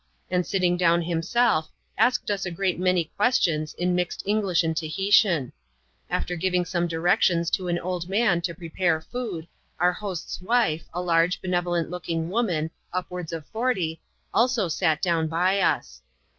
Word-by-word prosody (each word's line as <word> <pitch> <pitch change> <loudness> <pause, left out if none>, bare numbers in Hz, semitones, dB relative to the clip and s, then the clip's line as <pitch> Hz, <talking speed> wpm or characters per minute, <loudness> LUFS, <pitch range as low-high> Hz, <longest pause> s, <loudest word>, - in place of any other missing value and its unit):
and 180 -1 +1
sitting 180 -3 +2
down 170 -1 +4
himself, 170 +2 +1 0.3
asked 245 +1 +2
us 200 -1 -1
a 185 - -2
great 180 +1 -1
many 180 -3 +1
ques 245 +5 +4
tions, 155 -3 0
in 180 +1 0
mixed 180 0 -1
English 195 -4 +2
and 160 0 -1
Tahitian. 170 - +2 0.6
After 180 - -1
giving 180 +1 0
some 175 0 -1
directions 170 0 +2
to 185 - 0
an 175 0 0
old 180 0 -4
man 195 -4 +2
to 170 -1 -3
prepare 170 -1 0
food, 185 -3 -5 0.3
our 180 +1 +3
host's 185 -3 -5
wife, 185 -7 +1
a 175 - -3
lai^e, 170 +1 +2
benevolent 175 -2 -1
looking 170 -2 -3
woman, 175 -8 0 0.2
upwards 180 -2 -4
of 165 -3 -5
forty, 215 -9 -1 0.3
also 235 -4 +2
sat 155 -1 0
down 165 -3 +2
by 180 +5 +1 0.2
tis. 65 -2 -17
180 Hz, 155 wpm, -25 LUFS, 165-195 Hz, 0.6 s, down